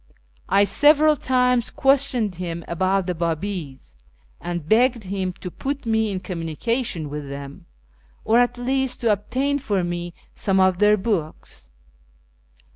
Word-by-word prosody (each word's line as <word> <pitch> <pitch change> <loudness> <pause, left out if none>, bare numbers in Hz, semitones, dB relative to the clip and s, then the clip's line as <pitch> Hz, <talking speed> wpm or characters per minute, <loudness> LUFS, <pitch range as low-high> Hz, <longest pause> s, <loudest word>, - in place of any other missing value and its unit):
I 195 +2 +5
several 300 +7 +5
times 250 -2 +1
questioned 270 -6 +2
him 170 -2 -5
about 190 +2 0
the 180 - -1
Bi'ibis, 165 - -4 0.5
and 175 -2 -5
begged 235 +2 +3
him 190 -1 -3
to 180 - -6
put 280 +5 -4
me 220 -1 +1
in 190 -2 -3
communication 175 - -3
with 145 -1 -6
them, 140 0 -9 0.6
or 230 +2 +4
at 245 0 +1
least 265 +1 -1
to 230 -2 +3
obtain 260 +8 -1
for 205 -8 -1
me 175 0 -4 0.2
some 195 -1 0
of 185 -1 +3
their 210 0 +5
books. 175 - -4
200 Hz, 135 wpm, -22 LUFS, 175-245 Hz, 0.6 s, I